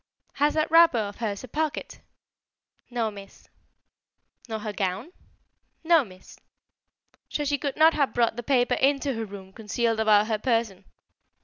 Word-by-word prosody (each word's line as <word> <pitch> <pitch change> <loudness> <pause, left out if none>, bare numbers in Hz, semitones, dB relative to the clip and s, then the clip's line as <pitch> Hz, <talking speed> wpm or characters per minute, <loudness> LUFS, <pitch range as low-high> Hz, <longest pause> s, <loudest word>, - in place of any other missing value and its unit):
"Has 295 +2 +1
that 310 0 0
wrapper 330 -5 +6
of 205 -2 -3
hers 210 -2 -4
a - - -8
pocket?" 300 +4 -3 0.9
"No, 235 -3 -2
Miss." 200 -1 -13 1.0
"Nor 220 - -3
her 210 -1 -5
gown?" 200 - -3 0.7
"No, 330 -2 +4
Miss." 185 -4 -15 0.9
"So 295 - -2
she 285 0 0
could 280 -2 -3
not 320 +1 +6
have 280 -3 +1
brought 235 -2 +1
the 240 - -5
paper 245 0 +1
into 275 0 +1
her 225 -1 -4
room 195 -2 -11
concealed 225 +1 -1
about 215 -1 +4
her 215 -1 -2
person?" 225 -5 -1
230 Hz, 150 wpm, -26 LUFS, 210-285 Hz, 1.0 s, wrapper